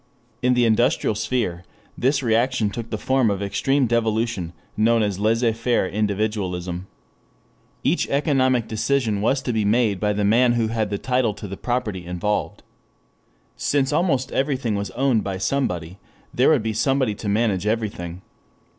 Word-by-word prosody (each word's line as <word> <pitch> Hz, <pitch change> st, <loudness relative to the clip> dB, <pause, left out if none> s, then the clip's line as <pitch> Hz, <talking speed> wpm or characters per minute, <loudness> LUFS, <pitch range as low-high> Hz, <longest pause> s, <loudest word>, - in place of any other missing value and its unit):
In 125 Hz, 0 st, +3 dB
the 120 Hz, -1 st, +3 dB
industrial 115 Hz, 0 st, +2 dB
sphere 105 Hz, -5 st, -2 dB, 0.3 s
this 135 Hz, +2 st, +1 dB
reaction 115 Hz, -1 st, +1 dB
took 115 Hz, +1 st, -6 dB
the 110 Hz, -, -3 dB
form 130 Hz, +1 st, +2 dB
of 100 Hz, 0 st, -2 dB
extreme 135 Hz, +7 st, +1 dB
devolution, 115 Hz, -5 st, 0 dB, 0.2 s
known 115 Hz, +1 st, +3 dB
as 100 Hz, -2 st, -2 dB
laissez 115 Hz, +2 st, +2 dB
faire 115 Hz, -3 st, 0 dB
individualism. 95 Hz, -4 st, -2 dB, 1.0 s
Each -, -, +1 dB
economic 130 Hz, -5 st, +2 dB
decision 110 Hz, -1 st, 0 dB
was 130 Hz, +5 st, +1 dB
to 125 Hz, -, -1 dB
be 110 Hz, -1 st, +1 dB
made 105 Hz, -2 st, +2 dB
by 105 Hz, 0 st, +1 dB
the 105 Hz, 0 st, 0 dB
man 120 Hz, +4 st, +4 dB
who 115 Hz, -2 st, 0 dB
had 110 Hz, -2 st, -1 dB
title 125 Hz, -5 st, +1 dB
to 105 Hz, -, -8 dB
the 95 Hz, -, -6 dB
property 110 Hz, -6 st, -2 dB
involved. 90 Hz, +4 st, -2 dB, 0.9 s
Since 140 Hz, 0 st, 0 dB
almost 145 Hz, -6 st, +1 dB
everything 130 Hz, -5 st, 0 dB
was 100 Hz, -1 st, -2 dB
owned 130 Hz, -5 st, +2 dB
by 95 Hz, -1 st, -3 dB
somebody, 95 Hz, -6 st, -2 dB, 0.3 s
there -, -, +4 dB
would -, -, +3 dB
be 110 Hz, 0 st, -1 dB
somebody 130 Hz, +1 st, +1 dB
to 105 Hz, 0 st, -5 dB
manage 105 Hz, -2 st, +1 dB
everything. 100 Hz, -6 st, -3 dB
110 Hz, 155 wpm, -22 LUFS, 100-125 Hz, 1.0 s, man